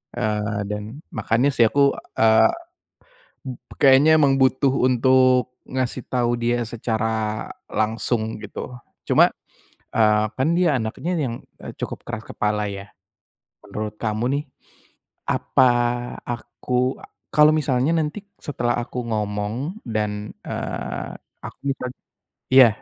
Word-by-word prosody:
Eee, 105 -1 -1
dan, 105 +8 -6
makanya 115 +5 +1
sih 115 - +5
aku, 140 +4 +4 0.2
eee, 110 0 +5 1.0
m 130 - -4 0.2
kayaknya 145 +3 +6
emang 140 -3 +4
butuh 130 +1 +3 0.2
untuk 130 0 +3 0.2
ngasih 130 -1 -2
tahu 120 -1 +1
dia 120 0 0
secara 110 -1 -2 0.2
langsung, 110 0 -1
gitu. 125 - -7 0.3
Cuma, - - +5 0.6
eee, 105 -1 +4
kan 130 +4 +2
dia 165 -7 +3
anaknya 115 +10 -3
yang, 130 -6 -1 0.3
eee, - - -8
cukup - - -5
keras 110 -2 -5
kepala, 105 0 -1
ya. 100 0 -8 0.7
Menurut 105 0 -5
kamu 110 +1 -1
nih, - - -6 0.9
apa 130 -1 +3 0.6
aku 125 +2 -2 0.3
kalo 150 0 +7
misalnya 135 -1 +1
nanti 160 +6 -2 0.2
setelah 120 -4 -1
aku 120 +1 -4
ngomong, 110 - -3
dan, 105 -2 -3
eee, - - -4 0.3
aku - - -10 0.2
jad 125 0 -4 0.6
iya, 130 -2 +9
120 Hz, 115 wpm, -22 LUFS, 110-130 Hz, 1.0 s, iya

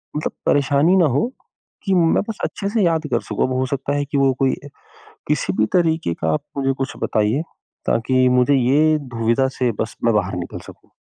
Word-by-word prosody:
मतलब 150 - -2
परेशानी 145 +5 +3
ना 175 - +5
हो, 235 - 0 0.5
कि 195 - 0
मैं 165 -2 +3
बस 220 - -4
अच्छे 200 - -3
से 215 0 0
याद 165 -3 +1
कर - - +2
सकूँ - - -1
अब 130 - -3
हो 130 - +1
सकता 140 +1 -2
है 145 0 -1
कि 140 0 -3
वो 135 -1 +3
कोई 135 -1 +3 0.7
किसी 145 -10 0
भी 110 +3 +2
तरीक़े 160 - +1
का - - +1
आप 150 -1 -2
मुझे 135 -1 +1
कुछ 135 - -2
बताइए, 110 +6 +1 0.5
ताकि 130 +3 +2
मुझे 140 +3 +4
ये 145 +5 +3 0.2
दुविधा 115 +4 +2
से 125 -2 +2
बस 110 - -4
मैं 115 - +4
बाहर 95 -2 0
निकल - - -8
सकूँ। - - -16
140 Hz, 200 wpm, -20 LUFS, 125-155 Hz, 0.7 s, ना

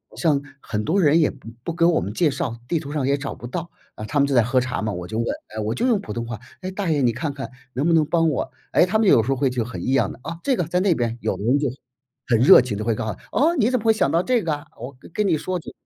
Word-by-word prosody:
“像 155 -5 +2 0.2
很 105 -1 -3
多 195 +5 +2
人 155 0 +5
也 155 - +3
不 135 -5 -13 0.2
不 170 - -2
给 170 0 0
我 170 -1 +4
们 100 +4 -4
介 160 +6 +2
绍， 130 -3 -3
地 165 - +1
图 145 -2 -7
上 145 -4 -1
也 140 +1 +2
找 140 -1 -5
不 - - -10
到。 170 +6 -5 0.3
啊， 110 - -6
他 145 +6 -1
们 140 - +4
就 140 - 0
在 120 - +6
喝 130 +3 +2
茶 130 0 -3
嘛， 110 -1 -1
我 90 -1 -6
就 110 - -4
问： 115 - 0 0.3
“诶”， - - -3
我 110 - -1
就 245 - 0
用 230 -5 +3
普 200 - -7
通 120 0 -3
话： 115 -2 -6 0.2
“诶， 185 - -4
大 190 -1 -3
爷， 145 -2 +1
你 120 -2 +3
看 140 +6 -3
看 135 -1 -6 0.2
能 135 +4 -1
不 170 - +3
能 160 -2 +4
帮 165 +1 +2
我？” 145 - -2 0.2
诶， - - +5
他 190 +4 +1
们 220 - +3
有 115 - +6
时 120 - -5
候 135 - +2
会 135 +1 +1
就 125 -3 -2
很 125 - -7
异 - - 0
样 135 - +2
的： - - -15
“哦， 165 +3 -6
这 270 - +2
个 180 - 0
在 180 +3 0
那 185 -1 +3
边。” 120 -2 -2
有 - - -1
的 - - -7
人 125 +6 +3
就， 145 - 0 0.6
很 120 - +3
热 125 - +8
情 120 -5 -4
地 105 - -3
会 115 - +2
告 110 - -4
诉： 95 - -9 0.2
“哦， 325 +5 +3
你 240 -3 +3
怎 255 - +1
么 220 - -10
会 225 - +6
想 140 -10 +1
到 165 - +3
这 245 +2 +1
个 160 - 0
啊？ 145 0 -6
我 125 +4 -8
跟 - - -15
跟 210 +4 0
你 165 -4 +2
说。 185 +4 -3
“就 - - -10
145 Hz, 350 characters per minute, -22 LUFS, 120-175 Hz, 0.6 s, 热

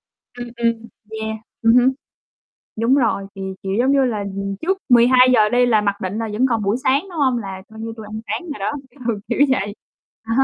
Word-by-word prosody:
vậy. 245 0 -10
Ừm, 235 - -11
ừm, 230 -1 0 0.4
yeah. 220 0 -3 0.3
Ừm 230 +1 +5
hưm. 250 +1 +5 0.8
Đúng 230 +4 +2
rồi, 230 -7 +1
thì, 195 - -8 0.2
kiểu, 195 - -3
giống 260 +3 +3
như 275 -1 +4
là, 230 -4 -1 0.2
ừm, 195 0 -3
trước 380 +3 0
12:00 245 -2 +6
đi 245 +2 +3
là 220 -3 +3
mặc 200 -1 -1
định 190 +3 -3
là 225 -1 -3
vẫn 245 +5 +2
còn 230 -3 0
buổi 200 +4 +1
sáng, 275 +2 +3
đúng 340 -4 -6
hông? 260 -4 +2
Là 195 -4 -6
coi 220 0 -12
như 225 0 -5
tui 220 - -8
ăn 215 +1 -7
sáng - - -2
rồi 285 - -6
đó, 195 - -1 0.4
ừ, 220 -3 0
kiểu 235 - -1
vậy. 205 -6 0 0.5
À 225 0 -3
ha. 270 - +5
230 Hz, 230 wpm, -20 LUFS, 210-250 Hz, 0.8 s, 12:00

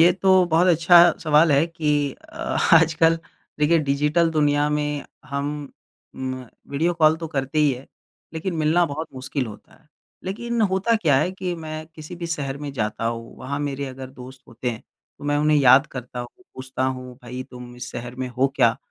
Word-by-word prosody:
ये 175 +2 +7
तो 190 0 +4
बहुत 170 +2 +3
अच्छा 170 0 +6 0.2
सवाल 155 0 +4
है 145 +4 +4
कि 150 -4 0
अ, - - -18 0.4
आजकल 165 0 +4 0.4
देखिए 165 +3 +4
डिजिटल 150 +3 +1
दुनिया 145 -1 +2
में 150 -1 -1 0.2
हम 140 0 -3 0.7
म 130 -1 -4 0.3
वीडियो 165 +5 +1
कॉल 155 -1 +4
तो 165 0 -5
करते 140 0 -2
ही 150 -2 +4
हैं, 130 +2 -8 0.5
लेकिन 170 +3 -3
मिलना 160 +3 +3
बहुत 155 +2 -5
मुश्किल 130 0 -3
होता 105 -2 -12
है। 155 - -31 0.4
लेकिन 235 +5 -3
होता 195 +5 +2
क्या 155 -10 +3
है 165 +6 +1
कि 185 -1 -3
मैं 155 -1 -6
किसी 155 +3 -9
भी 170 - -5
शहर 140 -5 -3
में 145 -2 -6
जाता 105 -3 -3
हूँ, 115 0 -5
वहाँ 140 +2 -4
मेरे 140 -1 -3
अगर 130 0 -8
दोस्त 130 0 -12
होते 120 +2 -3
हैं, 115 - -8 0.4
तो 145 - -11
मैं 145 0 +1
उन्हें 150 0 +3
याद 135 +1 +6
करता 125 -1 -8
हूँ, 120 - -6 0.3
पूछता 130 0 -3
हूँ, 130 -1 -4
"भई 125 +1 -6
तुम 125 -1 -10
इस 125 - -7
शहर 120 +1 -6
में 130 -1 -3
हो 130 +2 +1
क्या? 120 -3 +4
145 Hz, 190 wpm, -23 LUFS, 130-165 Hz, 0.7 s, ये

